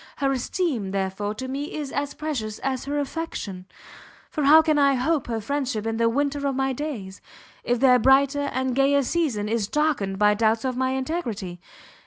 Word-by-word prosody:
Her 275 -1 0
esteem, 265 - -1
therefore, 195 +2 -2
to 260 +4 -5
me 280 +3 -4
is 295 -3 -4
as 285 0 -3
precious 270 -9 -3
as 265 -1 -2
her 285 +1 -2
affection, 275 - -4 0.6
for 300 -3 -1
how 315 +3 +8
can 310 -2 +2
I 280 -1 +4
hope 280 +3 0
her 230 -2 -2
friendship 255 -2 -2
in 225 0 -1
the 230 0 +3
winter 285 +3 0
of 275 - -1
my 265 0 0
days, 235 -9 -6 0.4
if 245 0 0
their 250 -1 +5
brighter 275 +3 +3
and 260 0 -1
gayer 275 +2 +3
season 255 -9 -1
is 220 -2 0
darkened 270 -10 0
by 210 +1 +4
doubts 220 +2 +1
of 255 -1 -1
my 260 +1 0
integrity? 235 - -4
260 Hz, 185 wpm, -24 LUFS, 220-285 Hz, 0.6 s, how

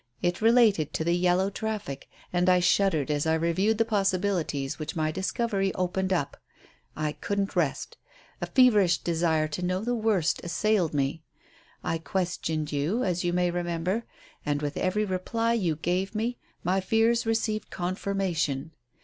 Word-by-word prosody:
It 175 +2 0
related 220 - +4
to - - 0
the 170 +1 +1
yellow 180 +2 +2
traffic. 210 -10 -4 0.2
And 180 +1 +3
I 180 0 +5
shuddered 175 -5 +2
as 150 +1 0
I 160 - +3
reviewed 185 +7 +1
the 225 - +3
possibilities 190 -9 0
which 155 +1 -5
my 155 -1 0
discovery 195 +2 -1
opened 185 +1 -1
up. 170 -7 -1 0.6
I 155 -1 -1
couldn't 200 +5 -2
rest. - - -1 0.4
A - - -2
feverish 210 -9 +5
desire 160 -2 +1
to 150 +4 -4
know 185 +1 -1
the 245 +2 0
worst 215 -8 +1
assailed 180 -2 +1
me. 140 +3 0 0.6
I 165 - -1
questioned 165 -3 -2
you 155 - 0
as 180 -1 0
you 175 - +1
may 180 0 +1
remember, 175 +5 -2 0.4
and, 145 0 -1
with 145 0 -2
every 210 +3 0
reply 225 +5 -1
you 180 -9 +1
gave 180 +6 -1
me, 235 +3 -2 0.2
my 185 +2 +1
fears 225 +4 +2
received 220 -1 -1
confirmation. 175 -5 -2
180 Hz, 155 wpm, -27 LUFS, 160-205 Hz, 0.6 s, I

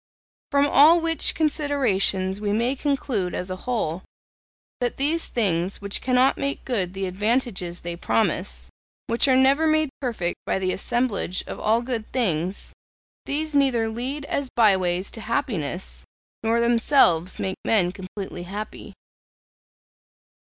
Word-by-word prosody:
From 280 0 +3
all 300 +4 +6
which 330 -1 +1
considerations 230 - +1
we 205 -1 0
may 235 +5 +1
conclude 265 - -1
as 180 +1 -4
a - - -2
whole, 185 -8 -1 0.8
that 245 -1 -2
these 310 +4 0
things 190 -5 0
which 200 0 -2
cannot 255 +1 +2
make 280 0 -3
good 195 -8 -2
the 195 0 -2
advantages 195 -2 -1
they 170 0 -5
promise, 65 - -1 0.3
which 230 +4 +3
are 260 - +4
never 275 +4 +4
made 310 -2 +2
perfect 220 -10 -2
by - - +1
the 185 -1 -1
assemblage 235 -5 -1
of - - -7
all 225 +3 +1
good 235 -3 -4
things 185 -6 -1 0.5
these 310 +2 -1
neither 260 -6 +2
lead 260 +6 -4
as 280 -2 -2
by 215 -4 +5
ways 180 0 0
to 225 - -7
happiness, 205 - -2 0.4
nor 225 +1 +1
themselves 230 - +3
make 190 0 -3
men 185 -5 +2
completely 190 -1 -7
happy.' 200 +4 -7
225 Hz, 140 wpm, -24 LUFS, 185-265 Hz, 0.8 s, all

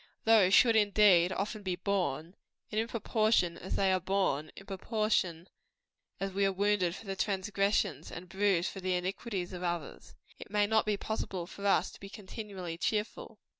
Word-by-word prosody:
Those 220 -5 +5
should, 230 -2 +6
indeed, 205 -4 +5
often 210 +3 -3
be 185 -3 -2
borne; 175 -4 -2 0.4
and 215 - 0
in 225 - -3
proportion 215 -6 +1
as 185 - -4
they 190 -1 +2
are 185 - +2
borne 185 -5 0
in 195 - -11
proportion 195 -3 -1 0.7
as 195 0 -2
we 200 +1 0
are 195 - +3
wounded 195 -2 +1
for - - -11
the 195 -1 -4
transgressions, 195 - 0
and 180 +2 -8
bruised 190 -1 +1
for 195 - -8
the 185 -1 -1
iniquities 185 +1 -3
of 180 - -6
others 175 -3 -5 0.2
it - - -10
may 205 0 +2
not 220 +1 +2
be 210 -1 +1
possible 195 -4 -4
for 200 +3 -5
us 195 - +2
to - - -14
be 195 - -9
continually 195 -4 -7
cheerful. 210 +2 -2
195 Hz, 175 wpm, -31 LUFS, 180-210 Hz, 0.7 s, should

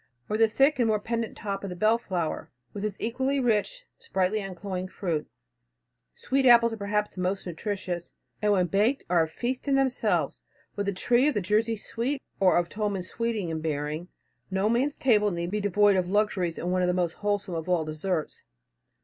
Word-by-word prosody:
Or 210 - 0
the 225 +1 +5
thick 270 +5 +3
and 235 - +3
more 215 -1 +2
pendent 230 +1 -3
top 200 -2 -4
of 195 - -4
the 180 - -5
belleflower, 190 -5 0 0.2
with 205 - -5
its 210 -2 -2
equally 265 +4 0
rich, 245 - 0
sprightly 210 - 0
uncloying 185 -1 -5
fruit. 170 -5 -3 0.9
Sweet 265 0 +1
apples 235 -1 +7
are - - -5
perhaps 210 0 -1
the 185 - -5
most 190 +2 -1
nutritious, 180 -1 -4 0.3
and 210 0 +3
when 185 -3 +3
baked 210 +9 +1
are 175 -2 +5
a 160 - +1
feast 245 - -4
in 275 - +3
themselves. 270 -2 +1 0.3
With 205 -1 -2
a - - +2
tree 240 +8 +2
of 300 - +1
the - - +2
Jersey 215 +4 +1
sweet 245 +7 -3 0.2
or 185 -2 +5
of 175 -1 +1
Tolman's 200 -2 -3
sweeting 230 -6 -2
in 160 -1 -3
bearing, 155 +2 -3 0.4
no 190 +2 +1
man's 260 +5 +1
table 210 -5 +3
need 170 -1 -3
be 210 0 -1
devoid 205 0 +4
of 180 -1 0
luxuries 195 -4 +1
and 175 - -2
one 185 0 +1
of 180 - +2
the 180 - +1
most 175 -2 -1
wholesome 205 -2 -1
of 165 +1 -4
all 170 -3 +2
deserts. 155 +1 -3
205 Hz, 195 wpm, -27 LUFS, 180-230 Hz, 0.9 s, apples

